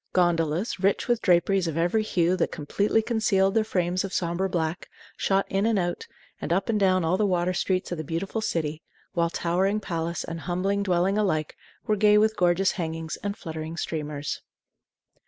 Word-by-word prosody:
Gondolas, 175 +2 +1
rich 195 +1 +1
with 240 -2 +1
draperies 180 +1 +3
of 160 -1 -3
every 175 +6 +2
hue 180 -4 +1
that - - 0
completely 200 +8 0
concealed 215 -4 +2
their 220 0 +3
frames 180 -3 0
of 195 -2 -4
sombre 175 +2 0
black, 170 0 -2 0.3
shot 195 0 +1
in 195 +3 +1
and 225 -2 +2
out, 175 -2 -2 0.3
and - - -4
up 190 +4 +1
and 215 -2 +2
down 185 -3 +3
all 175 +3 +2
the 210 - +2
water 180 -1 +1
streets 185 0 -1
of 175 - -3
the - - -3
beautiful 170 +8 -3
city; 155 -6 -2 0.3
while 170 -1 +1
towering 180 +4 0
palace 170 -3 -3
and 165 0 -6
humbler 185 +4 -1
dwelling 195 0 +1
alike 155 -7 0 0.3
were 215 - +2
gay 210 0 +5
with 220 +1 +3
gorgeous 180 +2 +3
hangings 165 -3 -4
and 205 0 -4
fluttering 160 -1 -6
streamers. 150 -3 -4
180 Hz, 180 wpm, -26 LUFS, 165-200 Hz, 0.3 s, gay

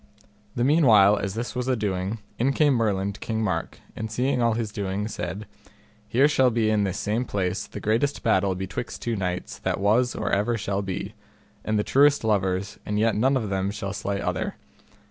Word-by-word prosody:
The 120 - 0
meanwhile 115 -9 +6
as 100 0 -3
this 120 +2 -4
was 125 0 -3
a 130 - +2
doing, 100 -1 -2 0.2
in 135 +4 +2
came 145 0 +3
Merlin 100 -4 0
to 105 - -13
King 110 0 -2
Mark, 85 -5 -2 0.2
and 110 0 -4
seeing 125 +3 0
all 115 -1 +3
his 110 -2 -2
doing, 100 0 -3
said, 105 -1 -5 0.6
Here 125 +6 +4
shall 130 -4 +3
be 110 -2 +1
in 105 -2 +2
this 95 - -2
same 110 +4 -1
place 100 -2 -2
the - - -8
greatest 115 +7 0
battle 95 0 +2
betwixt 95 +5 -5
two 120 -1 -1
knights 90 -2 -3
that - - -2
was 115 +5 +2
or 105 -1 -2
ever 105 +4 +1
shall 100 -1 -2
be, 95 -2 -4 0.5
and 110 0 0
the 105 - +1
truest 145 +3 +4
lovers, 100 -2 0
and 105 - -2
yet 110 +1 +2
none 130 +5 +3
of 110 -5 -3
them 95 0 0
shall 100 -1 -4
slay 100 0 -3
other. - - -2
105 Hz, 200 wpm, -25 LUFS, 100-120 Hz, 0.6 s, meanwhile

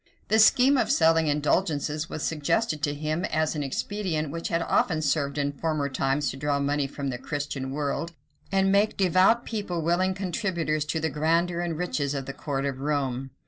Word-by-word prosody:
The 220 - +4
scheme 260 +5 +6
of 235 - +1
selling 165 -1 +4
indulgences 150 0 0
was 155 - -5
suggested 155 +2 0
to 145 0 0
him, 155 +4 -2
as 155 0 0
an 150 - -2
expedient 155 +1 -2
which 165 +1 -4
had 165 0 0
often 160 -3 +1
served 140 -1 0
in 145 0 0
former 145 0 -2
times 135 +2 0
to 135 - -9
draw 145 0 0
money 140 0 0
from 140 0 -4
the 125 -2 -4
Christian 140 -1 -4
world, 145 +4 -2 0.4
and 195 0 +3
make 205 +2 +2
devout 190 +5 +4
people 195 -7 -3
willing 185 +3 +1
contributors 175 -5 -1
to 160 +1 -2
the 160 0 -1
grandeur 170 +3 +1
and 170 -2 -2
riches 145 -5 -1
of 135 -1 -3
the 140 - -6
court 135 -1 -3
of 135 -2 -3
Rome. 135 -2 -2
155 Hz, 185 wpm, -26 LUFS, 145-175 Hz, 0.4 s, scheme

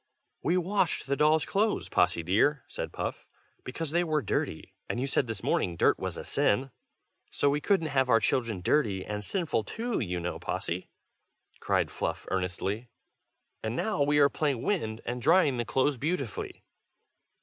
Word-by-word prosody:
"We 175 +4 +2
washed 185 0 0
the 140 - 0
dolls' 155 +2 +3
clothes, 210 +2 0
Possy 85 - +2
dear," 115 - +2
said - - -5
Puff, - - -4 0.4
"because 145 +4 -4
they 170 +2 +2
were 155 -4 0
dirty, - - -2 0.2
and - - -1
you 130 - 0
said 135 -1 +1
this 110 -3 -4
morning 85 - +1
dirt - - +3
was - - -4
a - - -6
sin." 130 +6 +1 0.6
"So 140 - +2
we 145 +1 0
couldn't 175 -2 +2
have 130 -2 +2
our 115 - +6
children 110 -3 0
dirty 100 -5 +1
and 105 0 -4
sinful 160 - -1
too, 230 - -3
you 90 -5 -2
know, 85 +1 -4
Possy!" 90 +2 -3 0.7
cried - - +1
Fluff, - - -3
earnestly. 95 +5 -2 0.7
"And 110 +1 -3
now 210 +1 -1
we 145 +1 +3
are 145 -1 +7
playing 140 -4 -1
wind, 115 - -1
and 120 +1 -3
drying 155 -1 +4
the 120 - -1
clothes 130 +4 +1
beautifully." 140 - -3
135 Hz, 170 wpm, -29 LUFS, 110-155 Hz, 0.7 s, are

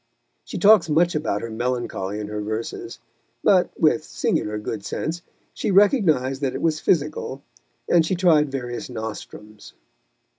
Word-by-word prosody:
She - - -7
talks 205 -5 +6
much 170 +3 +3
about 150 -10 -2
her 115 - -5
melancholy 115 -4 -3
in 105 - -4
her 105 0 -4
verses, 110 +2 -5 0.5
but, - - +4
with - - +3
singular 105 0 -1
good 105 0 -5
sense, 165 +10 -4 0.3
she - - -3
recognised 175 - +3
that 135 -2 -1
it - - -4
was 155 -1 +1
physical, 145 -5 -1 0.4
and 170 -2 +4
she 175 +4 -1
tried 160 -5 +3
various 120 -3 -5
nostrums. 110 -2 -8
135 Hz, 145 wpm, -23 LUFS, 110-165 Hz, 0.5 s, talks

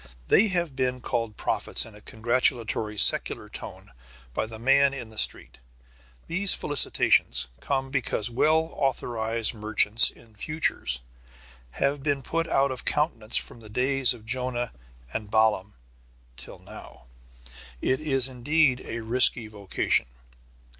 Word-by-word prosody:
They 220 - +5
have 175 -7 0
been 130 -1 -2
called 115 -3 -4
prophets - - 0
in 115 - -13
a 105 - -15
congratulatory 115 -2 -2
secular - - +5
tone - - -11 0.4
by 110 - -3
the 110 0 -10
man 135 +4 +2
in 120 -5 -8
the 110 - -15
street. - - +2 0.7
These 190 +3 +3
felicitations 65 - +3
come 135 - -3
because 130 -6 -1
well 155 +7 +1
authorized 115 -4 -1
merchants 110 0 +3
in 115 -2 -19
futures 105 - 0 0.7
have 140 0 -1
been 140 -1 -2
put 165 +4 -3
out 135 0 +1
of 130 - -7
countenance 120 -8 0
from - - -5
the 110 -2 -12
days 130 +2 +2
of 110 - -16
Jonah 125 0 -3 0.4
and 105 -2 -5
Balaam 105 -4 0 0.6
till - - -9
now. - - -14 0.7
It 130 - -1
is 135 -4 +2
indeed 130 +1 0
a 115 - -6
risky 120 0 +3
vocation. 100 - -2
125 Hz, 135 wpm, -25 LUFS, 110-140 Hz, 0.7 s, They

